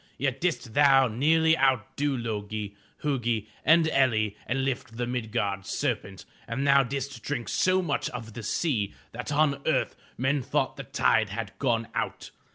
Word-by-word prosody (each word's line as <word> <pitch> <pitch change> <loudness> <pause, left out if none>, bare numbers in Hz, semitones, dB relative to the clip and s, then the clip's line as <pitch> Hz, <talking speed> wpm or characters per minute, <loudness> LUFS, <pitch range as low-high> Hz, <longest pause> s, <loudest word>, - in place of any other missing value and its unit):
Yet 135 -1 -1
didst 160 -9 -1
thou 135 -1 +6
nearly 160 +7 +3
outdo 135 +1 +1
Lo'gi, 105 -3 -4 0.3
Hu'gi 120 -7 0 0.2
and 160 +1 +5
El'li 110 -8 +2
and 135 +2 0
lift 120 -3 -3
the 120 - -1
Mid'gard 110 -5 -2
serpent, 100 -4 -3 0.2
and 130 +4 -2
thou 140 0 +6
didst 135 -1 -4
drink 130 -3 -3
so 185 0 +2
much 145 -5 -1
of 115 -3 -7
the 120 - -6
sea 110 - -1 0.2
that 125 +4 -5
on 145 -2 +2
earth 155 -4 +1 0.2
men 135 +3 +1
thought - - -1
the - - -6
tide - - +2
had 115 -3 -4
gone 115 -4 +1
out. - - -3
130 Hz, 160 wpm, -27 LUFS, 115-140 Hz, 0.3 s, thou